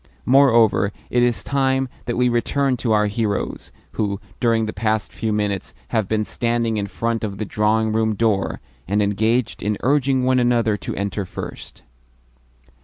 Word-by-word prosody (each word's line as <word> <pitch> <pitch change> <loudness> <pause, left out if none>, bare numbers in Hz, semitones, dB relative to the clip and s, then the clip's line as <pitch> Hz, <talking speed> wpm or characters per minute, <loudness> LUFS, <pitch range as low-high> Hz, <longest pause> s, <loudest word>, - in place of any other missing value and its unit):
Moreover, 115 -6 +4 0.2
it 120 - +3
is 120 -1 +1
time 135 -1 +1 0.2
that 120 - -2
we 125 0 +3
returned 125 +2 +1
to 115 - -1
our 105 -1 +4
heroes, 105 0 -2 0.2
who, 100 -2 -2 0.2
during 115 -2 +2
the 110 - -4
past 110 -1 -1
few 110 -2 -2
minutes, 105 -2 -2
have 110 -4 0
been 110 0 0
standing 115 -1 -1
in 100 -1 -2
front 115 +2 -2
of 100 -3 -3
the 110 - -3
drawing 110 +2 +1
room 110 -1 +1
door, 105 -2 0 0.3
and 105 +2 +2
engaged 110 +4 0
in 105 0 -1
urging 135 -1 +2
one 130 0 +3
another 120 -3 +2
to - - -5
enter 100 +1 -2
first. 90 - -8
110 Hz, 165 wpm, -21 LUFS, 105-120 Hz, 0.3 s, Moreover